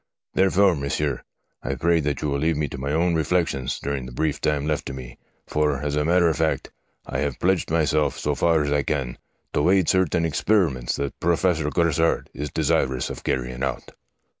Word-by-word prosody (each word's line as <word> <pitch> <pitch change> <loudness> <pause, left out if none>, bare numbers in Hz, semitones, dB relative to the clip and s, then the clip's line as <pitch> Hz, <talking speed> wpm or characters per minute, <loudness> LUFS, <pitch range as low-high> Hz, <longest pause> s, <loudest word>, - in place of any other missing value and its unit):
Therefore, 95 0 +4
monsieur, 70 -1 -2 0.4
I 70 - -3
pray 85 +5 +2
that 75 -2 -2
you 75 - 0
will 70 0 -1
leave 80 +1 +1
me 75 -1 0
to 70 - -7
my 70 +2 -2
own 85 +3 +2
reflections 80 -5 0
during 70 -3 -3
the - - -9
brief 75 +4 -1
time 75 -1 0
left 75 0 -1
to 70 - -5
me, 65 -2 -9 0.3
for, 75 -2 0
as 75 0 -1
a 75 - +1
matter 85 +2 +3
of 80 - +1
fact, 80 -1 -1 0.3
I 65 - -3
have 70 -2 -2
pledged 95 -1 +1
myself, 75 -2 +1
so 75 - -1
far 80 +1 +2
as 70 - -2
I 75 0 +2
can, 70 -4 -3 0.3
to 75 +4 +2
aid 95 -3 +3
certain 90 -3 +2
experiments 80 - +1
that 70 -1 -4
Professor 85 -2 +1
Grassard 85 -1 +1
is 75 +2 -4
desirous 65 0 0
of - - -8
carrying 60 0 -2
out.' 65 -2 -3
75 Hz, 195 wpm, -24 LUFS, 70-85 Hz, 0.4 s, Therefore